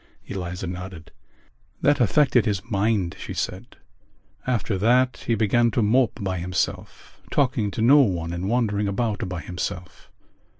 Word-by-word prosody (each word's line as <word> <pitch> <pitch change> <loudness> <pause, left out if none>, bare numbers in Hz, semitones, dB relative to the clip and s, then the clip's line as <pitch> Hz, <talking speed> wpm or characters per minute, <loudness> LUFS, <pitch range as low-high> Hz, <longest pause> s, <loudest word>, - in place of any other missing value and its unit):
Eliza 90 0 -5
nodded. 90 -2 -7 0.7
"That 145 0 +4
affected 125 -1 +3
his 100 -3 -1
mind," 100 -3 +1
she - - -6
said. - - -5 0.7
"After 115 -4 0
that 125 +4 +2
he 115 - +2
began 115 +2 +3
to 115 - +4
mope 120 +4 +2
by 95 -2 -2
himself, 90 +2 -4
talking 125 -7 +1
to 110 - -2
no 140 +5 +7
one 85 -9 +1
and 90 +3 -3
wandering 105 -4 +1
about 105 0 -2
by 90 -2 -4
himself. 90 +1 -6
105 Hz, 140 wpm, -24 LUFS, 90-120 Hz, 0.7 s, no